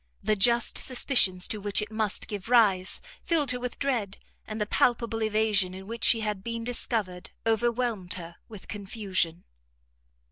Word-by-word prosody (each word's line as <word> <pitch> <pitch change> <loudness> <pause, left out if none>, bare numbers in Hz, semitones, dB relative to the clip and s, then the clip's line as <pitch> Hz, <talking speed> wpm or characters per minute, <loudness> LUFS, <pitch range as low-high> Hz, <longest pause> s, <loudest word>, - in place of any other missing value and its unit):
The 215 - +2
just 235 +4 +3
suspicions 240 -8 +4
to 215 - -2
which 205 0 +1
it 210 0 -4
must 215 -2 0
give 205 0 -6
rise 205 -6 +3 0.2
filled 300 -6 +1
her 250 - -3
with 250 0 -5
dread, 235 -8 -2 0.3
and 215 +1 -5
the 210 - 0
palpable 230 +1 +1
evasion 215 -4 +1
in 190 0 -9
which 230 +3 -7
she 225 - +5
had 210 -3 -3
been 230 +1 -4
discovered, 220 -6 -3 0.2
overwhelmed, 225 -4 0
her 170 -1 -9
with 210 -4 -12
confusion. 195 -5 -3
215 Hz, 155 wpm, -27 LUFS, 195-235 Hz, 0.3 s, she